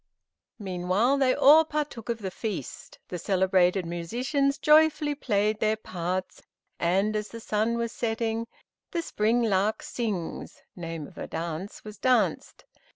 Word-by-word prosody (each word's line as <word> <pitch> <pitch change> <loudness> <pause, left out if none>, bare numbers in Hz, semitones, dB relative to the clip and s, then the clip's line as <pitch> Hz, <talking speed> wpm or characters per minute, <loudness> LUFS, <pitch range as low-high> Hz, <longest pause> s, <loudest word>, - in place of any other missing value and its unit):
Meanwhile, 190 +6 +1
they 260 -2 +3
all 305 +3 +7
partook 300 -7 -4
of 235 - 0
the 190 - -3
feast; 195 - -6
the 180 - -4
selected 185 -1 +2
musicians 250 - -1
joyfully 300 -1 +4
played 215 -5 0
their 215 0 +2
parts, 185 -2 -4 0.4
and 195 +5 +1
as 210 0 -2
the 230 - -9
sun 220 +1 0
was 235 -1 -2
setting, 225 0 -2 0.4
"The 340 -1 -2
Spring 230 -2 +1
lark 210 0 +1
Sings" 210 -8 -4
(name 165 -3 -5
of - - -13
a - - -5
dance) 165 +4 -5
was 210 -1 -10
danced. 255 -1 +1
215 Hz, 140 wpm, -27 LUFS, 185-240 Hz, 0.4 s, all